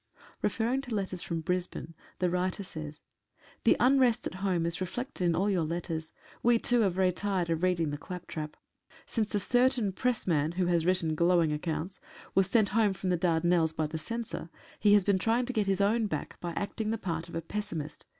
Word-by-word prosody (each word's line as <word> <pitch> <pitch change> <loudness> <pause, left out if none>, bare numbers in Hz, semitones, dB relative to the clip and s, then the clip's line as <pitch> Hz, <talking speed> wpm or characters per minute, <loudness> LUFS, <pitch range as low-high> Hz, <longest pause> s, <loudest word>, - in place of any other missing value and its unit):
Referring 240 +4 0
to 250 -5 -4
letters 190 -3 -2
from 165 -1 -3
Brisbane 180 -1 -3 0.2
the 180 -1 +1
writer 185 +2 -1
says: 155 -4 -8 0.3
— - - -28
The - - +5
unrest 250 -3 +4
at - - -3
home 185 -3 0
is 170 +2 -2
reflected 210 +3 -4
in 170 -1 +3
all 190 +4 +1
your 190 -4 +2
letters. 165 0 -3 0.3
We, 240 0 +5
too, 240 +1 +3
are 200 - +4
very 185 0 +2
tired 185 -2 -1
of 165 0 0
reading 175 -4 +1
the 145 - -4
claptrap. 165 -3 -6 0.5
Since 215 -3 -1
a - - +3
certain 245 0 +2
pressman 175 -9 0
(who 180 0 +1
had 170 -2 +2
written 175 -3 +1
glowing 170 -1 +3
accounts) 165 - -3 0.3
was 195 -1 +3
sent 210 0 +3
home 210 -1 +3
from 185 0 -2
the - - +3
Dardanelles 165 -1 +2
by 160 -1 -1
the 155 +1 -4
Censor 230 -1 -5 0.3
he 205 -1 +6
has 205 - +5
been 195 -1 +2
trying 230 +5 +2
to 255 - -3
get 215 -4 +1
his 195 0 +1
own 215 +2 +2
back 155 -7 -5
by 175 -1 -4
acting 210 +4 -3
the 225 - 0
part 170 -4 -4
of - - -8
a 165 - -1
pessimist. 165 -5 -5
185 Hz, 205 wpm, -30 LUFS, 165-210 Hz, 0.5 s, he